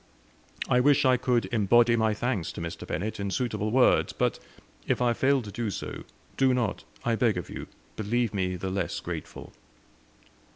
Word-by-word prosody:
I 125 - +3
wish 140 +2 +4
I 130 -1 +5
could 125 -1 +1
embody 115 +2 +4
my 110 -2 +1
thanks 110 -6 -2
to - - -7
Mr. 85 0 -6
Bennett 105 +5 -3
in 100 0 -2
suitable 110 -2 -1
words; 125 +3 +3
but - - 0 0.5
if - - +1
I 120 -1 +3
fail 135 +2 +2
to 105 - -8
do 115 +1 -2
so, 100 - -6 0.3
do 130 -1 +4
not, 115 -5 -1 0.2
I 120 - +2
beg 110 -3 +2
of 90 - -5
you, - - -6 0.3
believe 115 +2 0
me 90 -2 -1
the 95 +1 -4
less 95 -2 -2
grateful." - - -7
115 Hz, 175 wpm, -27 LUFS, 100-125 Hz, 0.5 s, I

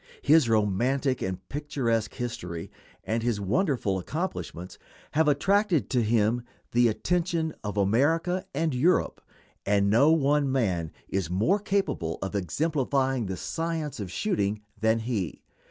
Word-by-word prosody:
His 150 -4 +5
romantic 120 +6 +1
and 95 0 -4
picturesque 130 -6 -1
history 90 -9 -5 0.3
and 115 +1 -1
his 115 -3 0
wonderful 105 - 0
accomplishments 95 - -5 0.3
have 160 +1 +2
attracted 175 - +2
to 125 -2 +3
him 110 +1 +2 0.3
the 120 0 +4
attention 165 - 0
of 105 0 -4
America 160 - +2
and 155 +1 0
Europe, 155 +9 +2 0.4
and 100 0 +2
no 140 +8 +5
one 145 -3 +2
man 95 -11 0 0.2
is 95 -4 -2
more 110 - +2
capable 195 - -1
of 95 - -4
exemplifying 135 - 0
the 95 -1 -4
science 160 - -3
of 100 -3 -4
shooting 105 - -1 0.2
than 110 +1 +2
he. 110 -7 -3
120 Hz, 130 wpm, -27 LUFS, 100-155 Hz, 0.4 s, His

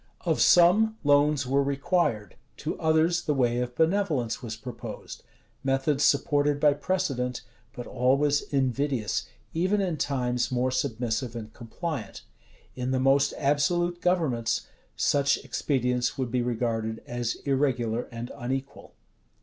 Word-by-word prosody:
Of - - 0
some, 210 +6 +5
loans 145 -1 +3
were 135 +2 +2
required:[] 140 - 0 0.2
to - - -3
others 160 +2 +2
the 150 - -1
way 120 -2 +1
of 125 0 -3
benevolence 160 - +1
was 115 -3 -5
proposed: 125 +2 -8 0.4
methods 135 +2 +1
supported 145 0 +2
by 145 -1 +5
precedent, 135 -7 -2 0.3
but 120 - -8
always 140 +4 +2
invidious, 135 -3 -1 0.3
even 185 +5 +1
in 180 -5 -1
times 125 -4 -1
more 125 +1 +1
submissive 120 -1 -2
and 110 -1 -7
compliant. 125 - -6 0.5
In 125 0 -3
the 130 0 +1
most 135 +1 +3
absolute 175 +5 +1
governments, 155 -11 0 0.3
such 140 -1 +2
expedients 125 -3 0
would 130 -3 -2
be 125 0 +1
regarded 115 -2 -2
as 120 -1 -2
irregular 125 -4 0
and 120 +1 -6
unequal. 135 +3 -5
135 Hz, 125 wpm, -27 LUFS, 120-150 Hz, 0.5 s, some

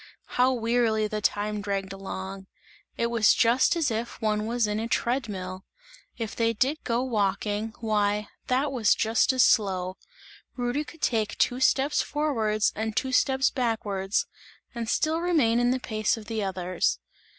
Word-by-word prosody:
How 250 +1 +3
wearily 230 -3 +1
the 215 0 -4
time 210 0 -1
dragged 195 -1 -3
along, 195 0 -7 0.5
it 235 0 0
was 225 -3 +4
just 240 +7 +3
as 315 -7 0
if 225 +2 -4
one 215 -1 0
was 235 0 +1
in 210 0 -1
a 225 - -2
tread 240 +1 0
mill! 185 -1 -6 0.5
If 225 -3 -4
they 230 0 +1
did 270 +7 0
go 235 +1 0
walking, 210 -1 -1
why, 210 -2 0 0.2
that 265 +3 +1
was 235 -6 +3
just 225 +3 +2
as 255 -2 +4
slow; 185 -3 +2 0.6
Rudy 245 +4 -1
could 325 - -13
take 220 -3 0
two 245 - +1
steps 275 +2 +3
forwards 225 -8 0
and 220 0 -3
two 265 - 0
steps 265 +1 +3
backwards 210 -6 -1 0.5
and 235 -2 -4
still 315 +5 +1
remain 295 -10 +2
in 245 0 +2
the 255 +1 +1
pace 215 -2 -1
of 220 - -9
the 220 0 -3
others. 185 - -1
225 Hz, 160 wpm, -26 LUFS, 205-250 Hz, 0.6 s, was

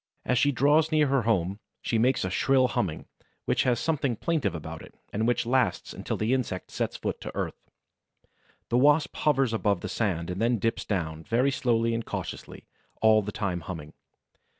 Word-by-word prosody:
As 125 -1 +2
she 145 - +4
draws 150 +5 +3
near 155 -1 +4
her 135 -1 +2
home, 100 -4 0 0.2
she 115 - 0
makes 125 -2 +2
a 95 - -3
shrill 130 +5 +3
humming, 85 -9 -2 0.4
which - - +2
has 125 -2 +2
something 140 -6 0
plaintive 135 - -1
about 80 - -7
it - - -14 0.2
and 110 +3 0
which 120 0 +1
lasts 130 +2 0
until - - -4
the 110 +4 +1
insect 120 -8 -2
sets - - -2
foot - - -4
to - - -7
earth. - - -5 1.0
The 120 - +3
Wasp 145 +3 +4
hovers 135 -5 +2
above 105 -4 +1
the - - -4
sand 90 -6 -1
and 90 +3 -4
then 120 +1 +2
dips 115 +2 -1
down, 80 -5 -2
very 125 +8 +2
slowly 115 -3 +1
and 115 0 -1
cautiously, - - -6 0.3
all 110 -1 +5
the 105 0 -5
time 95 -4 -2
humming. 75 -3 -7
115 Hz, 185 wpm, -27 LUFS, 100-130 Hz, 1.0 s, all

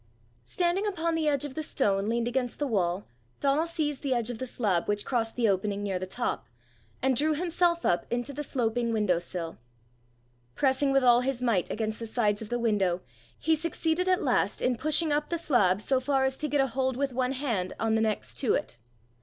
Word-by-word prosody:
Standing 360 +4 0
upon 335 -4 -1
the 320 -1 0
edge 285 -1 +1
of 285 - -6
the 315 - -3
stone 205 -9 0
leaned 235 0 0
against 245 0 -1
the 295 - -1
wall, 190 -6 0 0.3
Donal 285 +4 +2
seized 300 -4 -2
the 270 -3 0
edge 240 0 0
of 230 - -7
the 260 - -3
slab 200 -8 0
which 205 0 0
crossed 225 -3 -1
the 235 -2 +2
opening 200 +1 0
near 195 -3 -1
the 185 - -5
top, 215 - -3 0.6
and 265 -1 +3
drew 305 +4 +2
himself 340 +1 +1
up 175 0 +1
into 245 +3 -2
the 295 - -4
sloping 235 -3 -1
window 210 -6 +2
sill. 170 -1 -5 1.0
Pressing 275 0 +2
with 275 -1 +3
all 245 -1 +6
his 260 -1 -1
might 230 -8 +1
against 220 -1 -2
the 230 - -5
sides 215 -2 0
of 215 - -7
the 240 - 0
window, 200 -6 +1 0.4
he 320 - +1
succeeded 330 +2 0
at 370 - +2
last - - +1
in 250 - +1
pushing 310 +4 +2
up 295 +1 0
the 340 - 0
slab 205 - +2
so 260 +4 +1
far 270 +1 +1
as 265 0 +1
to 305 - -1
get 290 0 0
a - - +3
hold 260 0 -1
with 275 -1 -1
one 255 +1 0
hand 235 -10 -2
on 225 0 +1
the 220 - +2
next 220 -2 -1
to 255 - +2
it. - - -4
250 Hz, 215 wpm, -28 LUFS, 215-290 Hz, 1.0 s, all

